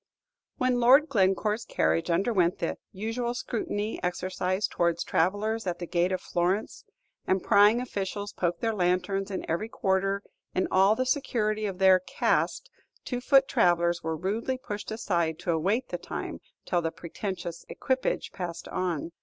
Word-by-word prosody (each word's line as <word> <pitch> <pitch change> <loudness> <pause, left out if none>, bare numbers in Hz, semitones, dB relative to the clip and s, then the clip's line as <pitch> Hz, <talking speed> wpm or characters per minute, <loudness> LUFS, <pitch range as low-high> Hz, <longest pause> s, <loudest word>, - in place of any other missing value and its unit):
When 255 -1 +1
Lord 270 +6 +6
Glencore's 210 0 +1
carriage 165 -5 0
underwent 180 -1 +2
the - - -3
usual 225 +4 -3
scrutiny 215 -2 -3
exercised 185 +2 -1
towards 170 -1 +1
travellers 205 +5 0
at 175 -1 -1
the 175 - -5
gate 175 +1 +1
of 185 - -1
Florence, 180 +5 -1 0.4
and 190 -1 +1
prying 210 +2 +5
officials 205 -4 -4
poked 175 -1 -1
their 225 -1 +1
lanterns 195 +1 0
in 190 - -4
every 190 +7 -2
quarter, 195 0 0 0.3
in 185 - +1
all 195 +3 +5
the 255 - 0
security 215 -6 0
of 190 -2 -5
their 190 -1 +6
"caste," 340 - 0 0.3
two 245 -1 -3
foot 270 +1 +5
travellers 175 0 +2
were 160 0 -2
rudely 220 +9 -2
pushed 210 -5 -6
aside 170 -7 -1
to 175 - -2
await 195 +10 0
the - - -4
time - - -5 0.3
till 175 - +1
the 165 - -1
pretentious 175 0 -6
equipage 260 0 -1
passed 175 -3 -5
on. 170 -3 -2
195 Hz, 155 wpm, -28 LUFS, 175-220 Hz, 0.4 s, Lord